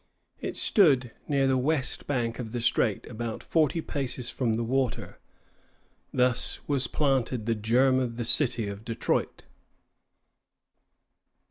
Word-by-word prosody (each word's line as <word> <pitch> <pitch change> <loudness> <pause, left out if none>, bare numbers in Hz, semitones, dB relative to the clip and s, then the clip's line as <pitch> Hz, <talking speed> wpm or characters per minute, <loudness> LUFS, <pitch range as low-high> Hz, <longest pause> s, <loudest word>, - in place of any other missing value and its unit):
It - - -4
stood 135 - +4 0.2
near 140 -2 +2
the 130 -1 +2
west 135 -1 -1
bank 120 -4 -1
of 115 -2 -6
the 120 - -2
strait, 120 -3 +1
about 115 -1 -5
forty 160 0 +1
paces 130 -5 -3
from 120 -2 0
the 115 - -1
water. 130 +1 -2 0.9
Thus 125 -1 +1
was 140 -3 +1
planted 130 -6 0
the 115 - +1
germ 125 +5 +3
of 120 -3 -3
the 120 - -3
city 120 -4 +1
of 100 +1 -7
Detroit. 115 -1 -2
125 Hz, 130 wpm, -27 LUFS, 115-135 Hz, 0.9 s, stood